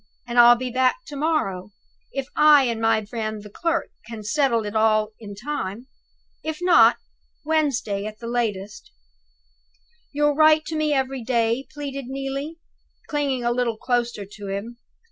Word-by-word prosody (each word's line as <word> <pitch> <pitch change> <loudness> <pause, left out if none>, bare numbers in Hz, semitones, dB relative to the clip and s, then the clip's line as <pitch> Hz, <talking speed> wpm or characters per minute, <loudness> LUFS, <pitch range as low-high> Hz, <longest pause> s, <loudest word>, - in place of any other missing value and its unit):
And 240 0 0
I'll 240 0 +9
be 250 +1 -4
back 260 - +1
to 290 - -9
morrow, 275 - -1 0.4
if 275 -1 -3
I 300 -2 +7
and 230 -3 -1
my 225 -1 +2
friend 215 -1 -4
the 210 - -12
clerk 330 +7 -1 0.2
can 225 -2 -8
settle 235 -1 +1
it 205 +1 -5
all 215 -1 +2
in 205 -3 -9
time. 230 -2 -5 0.6
If 315 0 -3
not, 240 -11 +6
by - - -34 0.5
Wednesday 255 -10 0
at 215 0 -9
latest." 225 - -3 1.2
"You'll 295 0 +2
write 310 +1 +5
to 320 - -4
me 310 -1 0
every 265 -2 -1
day?" 235 +1 0
pleaded 275 -2 -6
Neelie, 275 +4 -4 0.5
clinging 280 -4 -1
a 240 - +1
little 240 -2 -1
closer 240 -4 -1
to 205 0 -10
him. 210 +5 -5
240 Hz, 155 wpm, -23 LUFS, 220-290 Hz, 1.2 s, I'll